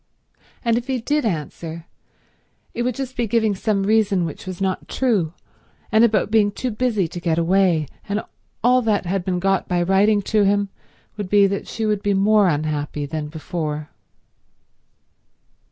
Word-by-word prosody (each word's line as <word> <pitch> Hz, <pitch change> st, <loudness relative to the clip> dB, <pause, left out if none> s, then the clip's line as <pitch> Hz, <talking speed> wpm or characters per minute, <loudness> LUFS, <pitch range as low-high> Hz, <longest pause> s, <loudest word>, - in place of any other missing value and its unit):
And 230 Hz, 0 st, +3 dB
if 245 Hz, -, -11 dB
he 260 Hz, -2 st, -1 dB
did 295 Hz, +4 st, 0 dB
answer, 165 Hz, -1 st, -5 dB, 0.9 s
it 240 Hz, -, -3 dB
would 245 Hz, -1 st, 0 dB
just 260 Hz, -1 st, -5 dB
be 240 Hz, -1 st, -1 dB
giving 220 Hz, -1 st, +2 dB
some 200 Hz, 0 st, 0 dB
reason 205 Hz, -3 st, +2 dB
which 160 Hz, +3 st, -7 dB
was 185 Hz, -2 st, -5 dB
not 190 Hz, -1 st, -2 dB
true, 205 Hz, -11 st, 0 dB, 0.6 s
and 220 Hz, +1 st, +5 dB
about 210 Hz, -3 st, +2 dB
being 210 Hz, -2 st, +4 dB
too 250 Hz, +4 st, -3 dB
busy 215 Hz, -5 st, 0 dB
to 175 Hz, -, -7 dB
get 170 Hz, -2 st, 0 dB
away; 170 Hz, -2 st, +3 dB, 0.2 s
and 205 Hz, +1 st, -1 dB, 0.4 s
all 250 Hz, +2 st, +5 dB
that 215 Hz, -4 st, 0 dB
had 185 Hz, +1 st, -1 dB
been 180 Hz, 0 st, -1 dB
got 195 Hz, +1 st, +1 dB
by 175 Hz, -1 st, +1 dB
writing 200 Hz, +3 st, +3 dB
to 215 Hz, +2 st, +2 dB
him 200 Hz, 0 st, +2 dB, 0.5 s
would 205 Hz, -3 st, -4 dB
be 205 Hz, 0 st, +5 dB
that 195 Hz, 0 st, -2 dB
she 225 Hz, -, -3 dB
would 210 Hz, -2 st, 0 dB
be 205 Hz, -1 st, +1 dB
more 205 Hz, +1 st, +4 dB
unhappy 150 Hz, -2 st, -1 dB
than 150 Hz, +1 st, -4 dB
before. 155 Hz, -1 st, -4 dB
200 Hz, 170 wpm, -21 LUFS, 175-220 Hz, 0.9 s, and